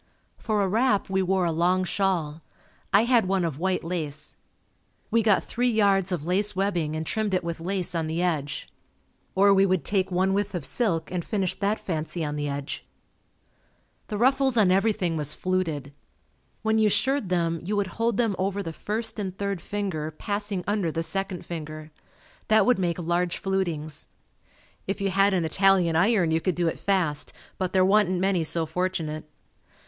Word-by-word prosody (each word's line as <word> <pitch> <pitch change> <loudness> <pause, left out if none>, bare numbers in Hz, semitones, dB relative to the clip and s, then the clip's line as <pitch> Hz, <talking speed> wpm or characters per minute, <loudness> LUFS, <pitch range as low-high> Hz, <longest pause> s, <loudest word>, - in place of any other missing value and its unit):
For 215 -3 0
a - - +1
wrap 215 -1 +1
we 190 0 +2
wore 190 0 +1
a 170 - +1
long 180 +3 +2
shawl. 175 -5 -1 0.5
I 200 +3 +5
had 235 -4 +3
one 190 -2 +1
of 155 -4 -3
white 185 +1 0
lace. 155 -3 -4 0.8
We 230 +1 +4
got 210 -3 +3
three 245 +1 0
yards 200 -4 +2
of 165 -4 -2
lace 195 +4 +1
webbing 175 -6 0
and 160 0 -3
trimmed 210 +2 0
it 180 - 0
with 170 -1 -4
lace 180 +1 -2
on 165 -2 -1
the 160 +2 -2
edge. 155 -5 -1 0.7
Or 200 +1 +6
we 195 0 +5
would 185 -6 +1
take 195 -2 0
one 190 +1 +1
width 205 0 -1
of 165 -6 -2
silk 170 - 0
and 180 -2 -2
finish 195 -3 -1
that 205 +2 +1
fancy 160 -1 -3
on 150 0 -3
the 145 0 -2
edge. 140 0 -4 1.2
The 210 - -3
ruffles 265 +2 +3
on 200 -4 +5
everything 195 -4 +1
was 150 0 -2
fluted. 160 -7 -2 0.7
When 220 0 +2
you 215 -1 +4
shirred 265 -1 +1
them 170 -2 0
you 205 +4 -2
would 205 +1 -2
hold 230 -2 +2
them 225 -5 +1
over 195 +1 -1
the 165 -2 -5
first 220 +5 -3
and 190 -2 -4
third 200 -3 -2
finger 190 -7 -3
passing 200 +3 -3
under 200 -5 0
the 165 +1 -2
second 195 0 -3
finger. 155 -2 -7 0.6
That 215 -2 +5
would 250 -5 +3
make 175 -3 0
large 175 0 0
flutings. 165 -6 -2 0.8
If 195 +2 -2
you 195 -1 0
had 195 +1 +3
an 175 -3 +1
Italian 185 0 +3
iron 185 -1 +3
you 160 0 +1
could 185 -1 0
do 175 -1 0
it 165 - -2
fast, 180 -7 0 0.3
but 185 -1 -1
there 185 -1 +4
wa'n't 190 -2 +3
many 190 -2 +1
so 165 +1 +2
fortunate. 160 -2 -3
185 Hz, 185 wpm, -26 LUFS, 165-200 Hz, 1.2 s, Or